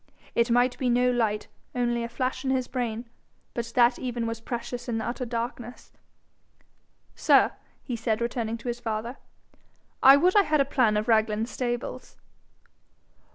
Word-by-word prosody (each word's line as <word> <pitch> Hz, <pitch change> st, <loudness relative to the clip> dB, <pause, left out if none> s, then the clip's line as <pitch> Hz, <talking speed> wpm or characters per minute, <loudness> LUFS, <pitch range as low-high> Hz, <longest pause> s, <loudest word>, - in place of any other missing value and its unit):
It 235 Hz, 0 st, +2 dB
might 245 Hz, +1 st, +2 dB
be 255 Hz, -, +1 dB
no 250 Hz, +1 st, +3 dB
light 220 Hz, -4 st, 0 dB, 0.3 s
only 240 Hz, -1 st, 0 dB
a 235 Hz, -, -4 dB
flash 255 Hz, +1 st, -2 dB
in 265 Hz, -, -1 dB
his 260 Hz, -2 st, 0 dB
brain. 240 Hz, -2 st, -3 dB, 0.5 s
But 235 Hz, -1 st, -4 dB
that 245 Hz, 0 st, +4 dB
even 245 Hz, -2 st, -3 dB
was 230 Hz, 0 st, -4 dB
precious 240 Hz, +1 st, -5 dB
in 230 Hz, -, -1 dB
the 225 Hz, -, -3 dB
utter 250 Hz, +1 st, -3 dB
darkness. 240 Hz, +1 st, -5 dB, 1.2 s
'Sir,' -, -, +4 dB, 0.3 s
he 245 Hz, -, -4 dB
said, 225 Hz, -1 st, -1 dB
turning 230 Hz, -2 st, -3 dB
to 230 Hz, -, -10 dB
his 240 Hz, 0 st, -2 dB
father, 230 Hz, +2 st, -4 dB, 0.8 s
'I 270 Hz, +1 st, +9 dB
would 360 Hz, +6 st, +3 dB
I 410 Hz, -, +8 dB
had 305 Hz, -6 st, +1 dB
a 275 Hz, -, +4 dB
plan 250 Hz, -6 st, +2 dB
of 210 Hz, -, -1 dB
Raglan 220 Hz, -1 st, +2 dB
stables.' 240 Hz, 0 st, -4 dB
240 Hz, 160 wpm, -26 LUFS, 230-250 Hz, 1.2 s, I